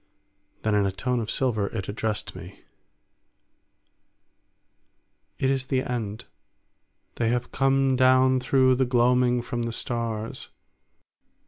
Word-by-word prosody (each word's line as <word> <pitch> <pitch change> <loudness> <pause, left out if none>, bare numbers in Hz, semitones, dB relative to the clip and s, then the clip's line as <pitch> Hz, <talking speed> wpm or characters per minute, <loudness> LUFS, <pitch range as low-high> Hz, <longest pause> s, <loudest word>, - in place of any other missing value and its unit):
Then 110 - +1
in 100 -1 +2
a - - -1
tone 125 +6 -2
of 110 -1 -4
silver 110 -6 0
it 95 - -5
addressed 105 -1 -3
me: 90 +4 -11 2.8
"It 135 - +1
is 130 -1 -2
the 130 -1 0
end. 115 -2 -4 0.9
They 115 -1 +1
have 125 +1 -2
come 135 0 +2
down 130 0 +4
through 130 0 +3
the 130 - +2
gloaming 125 0 +2
from 120 0 -4
the 115 0 -2
stars. 115 -2 -4
120 Hz, 120 wpm, -25 LUFS, 110-130 Hz, 2.8 s, down